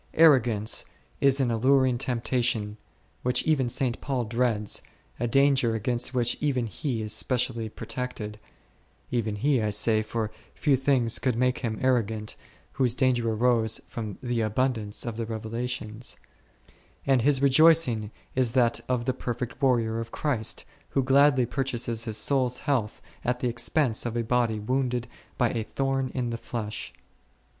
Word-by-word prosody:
Arrogance 120 -9 +4 0.4
is 140 0 +3
an 125 -3 +1
alluring 130 +1 +3
temptation 120 -4 0 0.5
which 125 0 +1
even 140 -6 +1
St. 125 -1 -1
Paul 130 -3 -1
dreads, 115 -2 0 0.4
a 120 - 0
danger 135 -2 +3
against 120 +3 -1
which 120 -2 +1
even 135 -5 0
he 115 - -3
is 105 - -3
specially 125 -3 -1
protected 115 -2 -6 0.7
(even 115 -4 -1
he, 130 +4 +1
I 105 - 0
say, 110 +1 +3
for 110 0 -3 0.2
few 145 -3 +2
things 130 -3 +3
could 130 -4 0
make 125 +1 +1
him 110 -4 -3
arro 130 -2 +3
gant, 105 0 -6 0.4
whose 125 -3 0
danger 125 -3 +1
arose 115 -1 +1
from 110 -4 -6
the 120 -2 -1
abundance 110 -1 0
of 115 -2 -4
the 115 -1 -3
revelations); 115 +1 -4 0.9
and 135 -3 +3
his 140 +2 +3
rejoicing 140 -5 +4 0.2
is 125 -3 +1
that 120 -3 +3
of 125 -2 0
the 130 - +1
perfect 125 0 -5
warrior 115 -4 +2
of 115 0 -5
Christ, 125 -8 -2 0.2
who 135 - +1
gladly 135 -1 +4
purchases 120 -3 -2
his 110 -2 -1
soul's 130 -3 +1
health 125 -8 -1 0.2
at 125 0 0
the 125 - +1
expense 120 +1 +1
of 120 0 -3
a 120 - 0
body 115 -2 +1
wounded 125 +1 -1 0.3
by 120 - +2
a 115 - -2
thorn 135 +3 -1
in 125 -2 -1
the 115 - -3
flesh. 110 -3 -5
120 Hz, 150 wpm, -27 LUFS, 115-130 Hz, 0.9 s, Arrogance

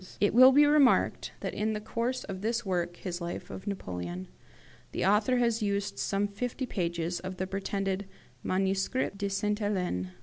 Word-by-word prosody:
"It 205 - +3
will 255 +3 +9
be 290 +2 +6
remarked 290 -3 +4
that - - -3
in 215 +1 0
the 210 - -2
course 235 +4 -2
of 190 -1 -6
this 230 +2 -1
work 175 -2 -1
[his 180 -2 -5
life 175 +1 -5
of 190 - -8
Napoleon] 90 - -5 0.6
the - - -1
author 210 +6 +3
has 235 -2 +2
used 200 -1 -1
some 200 +1 0
fifty 245 +6 -3
pages 170 -5 -2
of 185 0 -6
the 185 - -1
pretended 195 0 -2 0.4
'Manuscrit 195 +5 0
de 200 -1 -1
Sainte 210 +2 0
Helene'. 180 - -1
200 Hz, 170 wpm, -29 LUFS, 185-225 Hz, 0.6 s, will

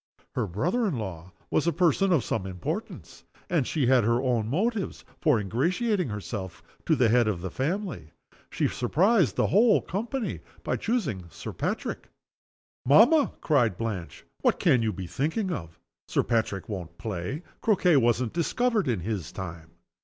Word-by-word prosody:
Her 120 -5 -1
brother 175 - 0
in 160 -10 -1
law 95 -5 -6 0.2
was 160 - +1
a - - +4
person 180 +3 +2
of 155 -9 +3
some 95 -5 -2
importance; 90 -2 -6 0.3
and 160 -8 +2
she 150 -5 0
had 125 -1 +4
her 115 +2 +2
own 120 -4 0
motives 200 - -1
for 150 -8 +3
ingratiating 175 - 0
herself 100 -2 -6 0.3
with - - +4
the 120 -3 +4
head 120 0 +4
of 95 -5 -1
the 95 -1 -4
family. 155 - -3 0.4
She - - 0
surprised 175 - +2
the - - +2
whole 220 +3 +5
company 225 +6 -3 0.2
by - - -1
choosing 160 - -1
Sir 80 +1 -8
Patrick. - - -3 0.7
"Mamma!" 235 - +5
cried 120 - +2
Blanche. 95 -10 -5 0.2
"What - - +3
can 125 - +4
you 110 -1 +1
be 95 -1 -6
thinking 160 - -1
of? 80 - -6 0.3
Sir - - +1
Patrick 110 -4 -1
won't 85 -5 -6
play. 110 - -4 0.2
Croquet 180 -7 +4
wasn't 120 -1 +2
discovered 215 - +1
in 115 -8 0
his 100 -3 -3
time." 85 -4 -7
125 Hz, 160 wpm, -27 LUFS, -, 0.7 s, whole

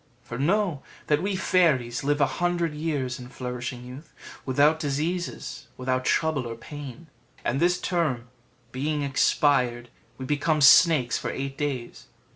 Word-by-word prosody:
For 120 - -7
know, 175 -1 +1 0.2
that 150 +1 +2
we 195 +1 -1
fairies 145 -11 +2
live 145 +1 +1
a - - +6 0.2
hundred 175 -2 +1
years 145 -5 -2
in 125 - -9
flourishing 125 -1 -5
youth, 135 +5 -11 0.3
without 145 +4 +3
diseases, 155 0 -3
without 130 0 -1
trouble 155 -5 +1
or 115 - -5
pain; 145 +4 -9 0.4
and 130 +3 0
this 180 +2 +2
term 150 -10 -1 0.4
being 145 +3 -2
expired, 125 -3 +1 0.3
we 130 - -6
become 150 +3 +1
snakes 140 -2 +6
for - - -3
eight 135 0 -4
days. 135 -5 -4
145 Hz, 140 wpm, -26 LUFS, 125-160 Hz, 0.4 s, a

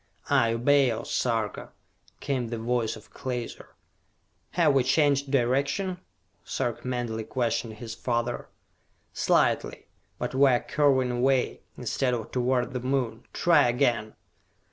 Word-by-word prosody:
"I 120 -5 +4
obey, 135 +3 +4
O 110 - -4
Sarka!" 115 -4 -1 0.5
came 130 -4 -2
the 115 0 -4
voice 115 0 -1
of 110 - -15
Klaser. 125 -2 -6 0.8
"Have 165 -5 +4
we 135 -2 +4
changed 140 +1 +2
direction?" 140 +9 0 0.4
Sarka 120 +1 -3
mentally 120 -3 -2
questioned 115 -1 -2
his 110 +1 -7
father. 120 0 -2 0.6
"Slightly, - - +1 0.3
but - - -4
we 135 +1 +5
are 125 -2 +3
curving 135 -4 +2
away, 125 +1 +1 0.2
instead 125 -2 0
of 115 -1 -6
toward 125 0 0
the 125 - -2
Moon! 125 -3 -2
Try 165 -7 +4
again!" 120 -4 0
125 Hz, 125 wpm, -27 LUFS, 115-135 Hz, 0.8 s, we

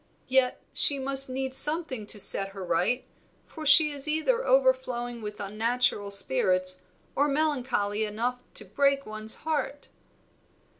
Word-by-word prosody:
Yet 260 -1 +1
she 285 - +3
must 270 0 +4
need 265 0 -4
something 295 -6 0
to 210 - -3
set 195 0 +4
her 195 -1 -8
right, 245 +9 -1 0.4
for 310 -2 -8
she 300 +1 +7
is 285 0 -2
either 315 +12 0
overflowing - - 0
with 210 0 -8
unnatural 215 +1 -1
spirits 185 0 +1 0.3
or 285 - +1
melancholy 260 -8 -1
enough 230 +4 -3 0.2
to 210 - -3
break 275 +7 0
one's 215 0 -4
heart." 290 -2 -4
255 Hz, 135 wpm, -26 LUFS, 210-290 Hz, 0.4 s, she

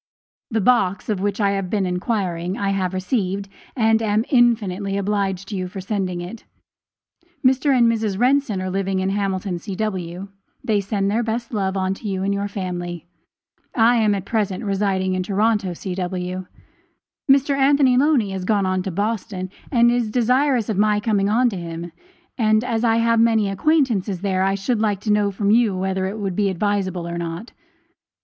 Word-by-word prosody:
The 220 -3 0
box, 200 -4 +2
of 210 -3 0
which 205 +1 -1
I 200 -2 +2
had 195 -2 -2
been 200 -1 0
inquiring, 180 -1 -2
I 200 - -1
have 190 -2 -1
received, 195 0 -1 0.3
and 225 -2 +3
am 215 +1 +1
infinitely 210 -6 +2
obliged 195 -1 -1
to 210 - -4
you 185 -1 -3
for 185 +2 -8
sending 190 -2 -2
it. 185 +6 -8 1.0
Mr. 265 +3 +3
and 240 - +5
Mrs. 220 -4 0
Renson 250 -5 +2
are 185 - -3
living 195 0 -1
in 190 +1 0
Hamilton, 195 -2 -2
C.W. 190 -2 -4 0.4
They 210 -3 +1
send 200 0 -1
their 225 +3 +1
best 230 +1 -3
love 195 -2 -1 0.2
to 210 - -8
you 190 -1 -2
and 200 +1 0
your 200 0 -2
family. 175 -4 -5 0.7
I 235 +1 +4
am 215 -2 +3
at 195 -1 -5
present 205 -2 -1
residing 195 -2 0
in 185 - -1
Toronto, 200 -1 0
C.W. 185 0 -4 0.8
Mr. 275 +1 +3
Anthony 275 -1 +4
Loney 260 -6 +3
has 190 -1 -4
gone 200 0 +1
on 185 0 0
to 190 - -4
Boston, 195 -1 -3 0.2
and 235 -3 +4
is 240 -2 0
desirous 250 +1 +2
of 210 -3 -1
my 210 0 +3
coming 205 -2 +1
on 240 +4 +3
to 195 - -5
him; 170 0 -6 0.5
and 215 -1 +3
as 230 -2 -1
I 225 -1 +3
have 230 0 +3
many 225 -3 +3
acquaintances 215 - +1
there, 190 -2 0
I 195 +1 +2
should 210 +3 -1
like 205 -3 +1
to 210 - -1
know 205 -1 +2
from 200 +1 0
you 220 -4 +3
whether 190 0 -1
it 200 +3 -5
would 195 -4 -3
be 205 0 +1
advisable 190 -2 -1
or 170 0 -4
not. 170 +6 -5
200 Hz, 180 wpm, -21 LUFS, 185-225 Hz, 1.0 s, and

